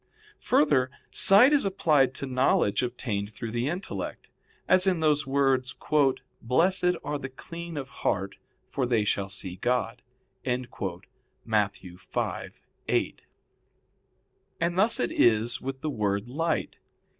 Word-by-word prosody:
Further, 145 - +3 0.2
sight 230 +9 +6
is 290 - +4
applied 150 -9 +2
to - - -5
knowledge 130 -5 +2
obtained 120 -5 -3
through 110 +1 -6
the 120 +4 -1
intellect, 180 +4 -5 0.4
as 185 +1 +4
in 180 -3 +2
those 150 -2 +2
words: 135 -2 +1 0.7
"Blessed 180 +8 +2
are 145 0 -3
the 135 - -6
clean 170 +4 -8
of 135 -2 -4
heart, 95 0 -1 0.3
for 130 -3 -2
they 115 -3 +2
shall 100 -1 -1
see 95 -2 -6
God" 120 +2 -1 0.4
(Matt. 125 0 -2 1.0
5:8). 90 +1 -4 1.4
And 170 +1 0
thus 220 +4 +3
it 120 - 0
is 115 0 +2
with 135 0 -5
the 155 - -2
word 100 -2 -1
light. 160 +5 -2
130 Hz, 120 wpm, -27 LUFS, 115-165 Hz, 1.4 s, sight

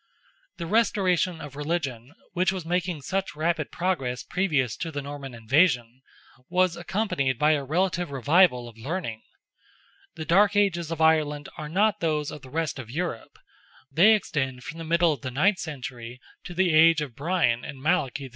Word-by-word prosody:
The 170 - -5
restoration 185 -4 +1
of 145 -2 -9
religion, 145 -5 -3 0.2
which 185 +1 +2
was 185 -3 -5
making 175 -3 -2
such 190 +5 -2
rapid 160 0 -1
progress 135 -10 -2
previous 145 - 0
to 170 - -4
the 145 - -4
Norman 140 -3 -7
invasion, 125 0 +2 0.5
was 180 -1 +2
accompanied 170 - -1
by 150 +4 +3
a 145 -2 +1
relative 175 +4 0
revival 140 -1 +3
of 115 -1 -14
learning. 125 -4 -4 0.9
The 160 -2 -6
dark 200 +6 +4
ages 175 -5 +1
of 165 -1 -4
Ireland 150 -2 +2
are 150 -1 -6
not 210 +5 +2
those 155 -4 -1
of 150 - -9
the 130 - -13
rest 155 0 -2
of 120 -4 -8
Europe—they 165 - 0
extend 130 -10 -3
from 165 - -8
the - - -5
middle 170 0 +3
of 135 - -9
the 130 - -4
ninth 180 +10 +2
century 125 -6 -7 0.3
to 175 - -8
the 180 -2 +2
age 160 0 +6
of 135 -6 -5
Brian 145 -7 +1
and 135 - -8
Malachy 145 -3 0
II. 135 - -8
155 Hz, 170 wpm, -26 LUFS, 135-180 Hz, 0.9 s, age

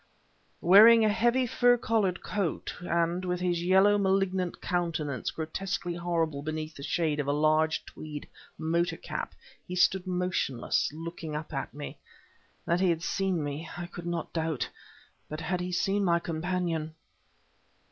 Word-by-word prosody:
Wearing 220 +5 +8
a - - +4
heavy 240 +4 +2
fur 245 +1 +4
collared 210 -6 0
coat, 195 -6 -2
and 170 +1 0
with 180 -1 -1
his 175 -1 0
yellow, 190 +3 +5
malignant 190 -2 +1
countenance 155 -7 -2
grotesquely 175 +2 -3
horrible 165 -4 -1
beneath 155 +1 -4
the 140 - -11
shade 155 0 0
of 145 - -1
a - - +2
large 155 +2 +2
tweed 150 -2 -8 0.3
motor 165 +1 0
cap, - - -5 0.3
he 180 - -4
stood 185 +1 +3
motionless, 180 -11 0
looking 165 0 -6
up 155 0 -5
at 135 - -3
me. 145 +1 -8 0.7
That 170 +1 +1
he 185 -1 +3
had 165 -1 0
seen 190 -4 0
me, 145 +3 -4
I 175 - -4
could 175 0 -8
not 170 -1 -3
doubt; 160 -6 -1 0.6
but 155 +1 -5
had 180 +3 -1
he 180 0 -3
seen 195 +3 +1
my 170 -2 +3
companion? 165 -1 -2
175 Hz, 150 wpm, -29 LUFS, 155-185 Hz, 0.7 s, Wearing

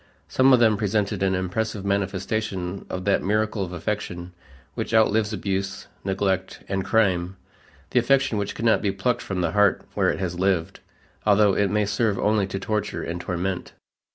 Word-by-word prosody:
Some 130 +1 +4
of 125 - +6
them 110 -3 +4
presented 105 -1 0
an 95 -1 +2
impressive 100 +2 -2
manifestation 100 -1 -2
of 90 0 -4
that 100 - +2
miracle 105 +1 0
of 90 - -6
affection 90 0 -4 0.4
which 115 - -2
outlives 110 -1 +3
abuse, 95 -1 -3 0.2
neglect, 95 -1 -1
and 95 -1 -1
crime, 95 -5 +1 0.5
the 125 - +4
affection 125 -3 +2
which 100 - -3
cannot 115 0 +2
be 100 - +1
plucked 100 +6 -1
from 95 -2 -3
the 85 -2 0
heart 105 +1 +3
where - - +2
it - - -1
has 90 -2 -3
lived, 95 -2 0 0.4
although 105 -1 +4
it 100 0 +2
may 105 +1 +1
serve 105 0 0
only 105 -2 +2
to 95 - -4
torture 105 +1 -2
and 85 +1 -4
torment. 90 +1 -3
100 Hz, 170 wpm, -24 LUFS, 95-105 Hz, 0.5 s, of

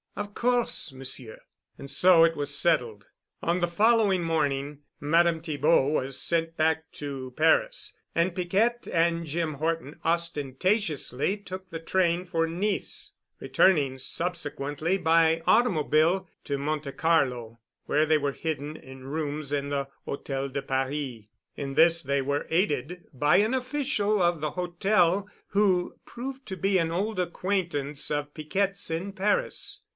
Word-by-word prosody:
"Of 205 0 -5
course, 240 - +1
Monsieur." 130 -3 -6 0.4
And 140 - -9
so 165 +4 +7
it 165 0 +1
was 145 -1 -1
settled. 120 -12 +1 0.4
On 170 +2 +1
the 175 - +1
following 205 0 +3
morning 145 -3 -1 0.2
Madame 165 +2 +2
Thibaud 155 -3 +2
was 135 -2 -1
sent 165 +2 0
back 160 0 0
to 135 -3 -6
Paris. - - +2 0.2
And 170 +1 +1
Piquette 205 +7 0
and 170 0 +1
Jim 160 0 -2
Horton 160 0 -3
ostentatiously 170 - 0
took 190 -1 -9
the 165 - -6
train 175 +1 +1
for 165 -2 0
Nice, 195 +5 -2 0.3
returning 145 -8 +2
subsequently 160 +1 -2
by 165 -2 +3
automobile 180 -4 +3 0.2
to 140 -2 -2
Monte 150 0 -3
Carlo, 125 -8 0 0.3
where 150 +1 +2
they 155 0 +3
were 140 -2 -1
hidden 155 -1 -4
in 130 -3 -12
rooms 145 0 -3
in 140 -1 -1
the 140 -1 -2 0.2
Hôtel 135 -1 -4
de 140 +1 -3
Paris. 135 -3 -3 0.3
In 135 -1 -5
this 165 +2 +5
they 140 -1 0
were 140 +2 -2
aided 175 -1 -1
by 145 +3 +3
an 215 +5 +2
official 255 -6 0
of 175 -3 +2
the 150 -1 -1
Hotel 180 +2 +1 0.2
who 190 -3 +1
proved 265 +2 -7
to 190 -2 -5
be 195 +1 +2
an 165 -1 0
old 200 +4 -2
acquaintance 170 -6 -1
of 145 0 -2
Piquette's 190 +5 -1
in 180 +5 -3
Paris. 200 +2 -1
165 Hz, 140 wpm, -27 LUFS, 145-185 Hz, 0.4 s, so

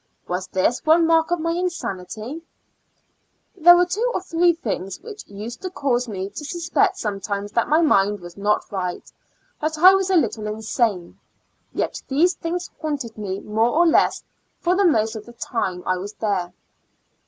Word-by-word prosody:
Was 180 +1 -3
this 190 +6 0
one 325 +2 +5
mark 325 0 +3
of 350 0 0
my 330 +1 -1
insanity? 250 - -4 1.1
There 350 0 +8
were 355 - +4
two 425 +8 -1
or - - 0
three 345 -1 +3
things 195 - -4
which 430 -1 -10
used 215 +4 -8
to 370 - -4
cause 255 -7 0
me 195 -2 -5
to 255 - -7
suspect 350 +5 0
sometimes 205 -1 -3
that 235 - 0
my 310 +3 +4
mind 205 -9 +3
was 175 0 -11
not 205 +1 0
right, 180 -3 -4 0.5
that 310 +1 -1
I 370 +4 +8
was 385 -1 +1
a 380 - +3
little 230 -9 +1
insane 215 -4 -2 0.2
— - - -45
yet - - -3
these 325 +7 +3
things 345 +1 -4
haunted 280 -8 -3
me 200 -2 -4
more 220 +2 +1
or 345 - +5
less 330 - +3 0.4
for 360 +1 +1
the 395 +1 +3
most 225 -9 +2
of 215 +1 -8
the 240 - -12
time 190 -6 -3
I 185 - +1
was 200 +3 -6
there. 195 -6 -2
240 Hz, 175 wpm, -22 LUFS, 205-340 Hz, 1.1 s, There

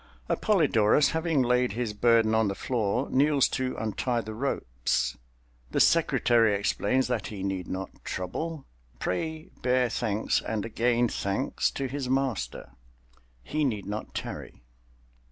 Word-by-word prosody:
Appolidorus 145 - +3
having 160 -4 +1
laid 125 -2 +2
his 115 -2 -2
burden 110 +1 +3
on 110 -1 +3
the 100 - -2
floor, 120 +2 -1
kneels 140 0 +4
to 130 -1 -2
untie 115 +3 -1
the 110 -1 -7
ropes. - - -1 0.5
The - - -1
secretary 120 -9 +4
explains 105 +5 +1
that 125 -3 -2
he 100 -3 -6
need 95 -2 -2
not 95 0 -6
trouble, 150 - -4 0.3
pray 160 - -3
bear 125 -1 +2
thanks 110 -2 0
and 110 -2 -3
again 120 +1 +2
thanks 100 +4 -1
to 135 - -2
his 135 -1 -4
master—he 60 - -4
need 110 -8 -1
not 105 +2 -5
tarry! - - -6
115 Hz, 130 wpm, -28 LUFS, 100-135 Hz, 0.5 s, kneels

